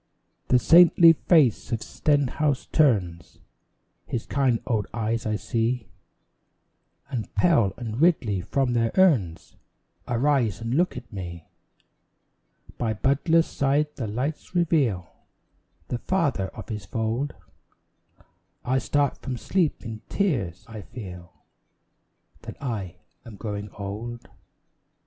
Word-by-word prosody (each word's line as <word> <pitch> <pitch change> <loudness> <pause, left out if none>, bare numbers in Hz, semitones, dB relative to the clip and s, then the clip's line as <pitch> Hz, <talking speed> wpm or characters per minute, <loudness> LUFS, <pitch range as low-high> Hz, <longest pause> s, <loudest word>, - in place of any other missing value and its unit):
The 125 - +5
saintly 165 +3 +7
face 150 - +2
of 115 -1 -1
Stenhouse 145 -1 0
turns 95 - +1 0.7
His 115 - -3
kind 130 -4 +1
old 110 -5 -1
eyes 115 0 -1
I 110 - 0
see; 115 +1 -1 1.2
And 120 -5 -4
Pell 120 - +3
and 115 +1 -4
Ridley 120 - +2
from 125 +6 0
their 115 -1 +1
urns 130 - +2 0.5
Arise 125 -3 +1
and 115 +1 -3
look 175 +2 +1
at 120 -2 -10
me. 85 -4 -8 1.3
By 115 -2 0
Butler's 160 - +2
side 145 +2 0
the 115 - -4
lights 135 - -4
reveal 145 - +1 0.8
The 120 - -2
father 145 - 0
of - - -11
his 105 -3 -5
fold, 115 +7 -2 1.3
I 130 +2 +2
start 140 +2 0
from 130 -2 -5
sleep 165 - -1
in 110 -1 -6
tears, 125 - -1
and 110 -3 -8
feel 90 -6 -9 1.1
That - - -9
I 105 -10 -4 0.3
am 115 -4 -11
growing 105 0 -5
old. 110 +4 -6
120 Hz, 115 wpm, -25 LUFS, 105-145 Hz, 1.3 s, saintly